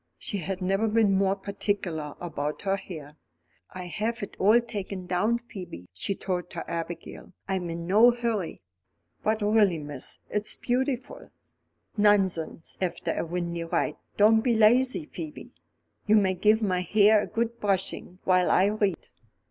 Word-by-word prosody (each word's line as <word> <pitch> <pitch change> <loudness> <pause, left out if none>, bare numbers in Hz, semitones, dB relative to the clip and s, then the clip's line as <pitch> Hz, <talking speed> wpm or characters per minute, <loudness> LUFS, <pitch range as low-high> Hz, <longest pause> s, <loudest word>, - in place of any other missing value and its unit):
She 200 - -3
had 190 +2 -3
never 195 +4 +1
been 215 -1 +3
more 195 0 +2
particular 195 -6 -3
about 150 -3 -4
her 195 -1 +1
hair. 155 -6 -9 0.5
"I'll 180 -1 -7
have 215 +5 -2
it 200 - -7
all 215 +5 +6
taken 200 -5 -5
down, 185 +6 +1
Phoebe," 185 - -10
she 195 - -2
told 180 -2 -3
her 170 - -4
Abigail; 170 +2 -6
"I'm 190 -3 -2
in 170 0 -5
no 215 +7 +6
hurry." 230 - -2 0.6
"But 215 0 0
really, 205 -4 +4
miss, 145 -3 -5
it's 210 0 0
beautiful 260 - -2 0.4
" - - -48 0.3
"Nonsense 190 -6 +1
after 180 -2 -1
a - - -1
windy 170 0 -3
ride; 165 -2 -1 0.2
don't 220 +2 +6
be 235 -1 +2
lazy, 250 +7 +4
Phoebe. 305 0 -8 0.6
You 215 - +5
may 195 -3 +4
give 215 +4 +3
my 185 -3 +1
hair 210 +3 +5
a - - -4
good 235 +1 -2
brushing 195 -3 -2
while 185 -1 +3
I 190 +2 +4
read." 205 -5 -1
195 Hz, 155 wpm, -27 LUFS, 175-220 Hz, 0.6 s, all